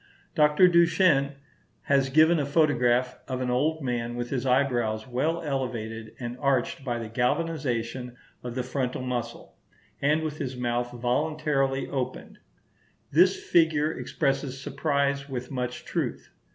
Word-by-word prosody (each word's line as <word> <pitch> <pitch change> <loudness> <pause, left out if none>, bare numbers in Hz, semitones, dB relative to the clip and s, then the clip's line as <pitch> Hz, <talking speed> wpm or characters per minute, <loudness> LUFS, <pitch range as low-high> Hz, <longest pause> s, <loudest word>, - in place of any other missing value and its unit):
Dr. 150 +4 +5
Duchenne 170 -5 +4 0.5
has 135 -1 +2
given 160 +4 +5
a 145 - 0
photograph 125 -5 +2
of 130 -1 -3
an 125 -1 -1
old 155 +5 0
man 120 -2 -2
with 120 0 -4
his 135 -1 -1
eyebrows 120 -4 +1
well 155 +7 -1
elevated 115 -6 -4
and 120 -1 -5
arched 135 -1 0
by 120 -3 -2
the 115 -1 -5
galvanization 125 -1 -2 0.2
of 120 -1 -6
the 130 - -1
frontal 130 0 -2
muscle; 120 -2 -5 0.4
and 150 +3 +2
with 155 -1 -4
his 130 -3 -4
mouth 120 0 -1
voluntarily 135 +2 0
opened. 130 -3 -5 0.7
This 180 +5 +4
figure 155 -2 +3
expresses 135 -4 -2
surprise 140 0 -1
with 125 -1 -5
much 125 -2 -4
truth. - - -3
130 Hz, 135 wpm, -27 LUFS, 125-150 Hz, 0.7 s, Dr